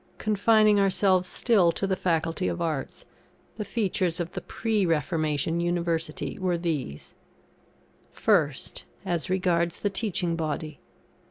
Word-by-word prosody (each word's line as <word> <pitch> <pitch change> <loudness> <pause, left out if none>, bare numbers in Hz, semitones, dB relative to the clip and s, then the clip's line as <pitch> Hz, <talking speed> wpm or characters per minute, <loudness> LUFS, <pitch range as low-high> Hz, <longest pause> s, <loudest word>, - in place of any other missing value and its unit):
Confining 215 0 +4
ourselves 190 -2 +2
still 200 -8 +3
to - - -2
the 190 -1 0
Faculty 165 0 0
of 175 - -2
Arts, 160 -5 -3 0.5
the 215 - -2
features 185 -6 -1
of 175 0 -3
the - - -5
Pre 220 -3 -1
Reformation 155 0 0
University 170 0 -2
were 180 -2 0
these: 150 - -4 1.0
First, - - 0 0.2
as 175 -4 -2
regards 175 -2 +1
the 205 - 0
teaching 185 -5 -1
Body. 155 -2 -4
175 Hz, 120 wpm, -26 LUFS, 165-195 Hz, 1.0 s, Confining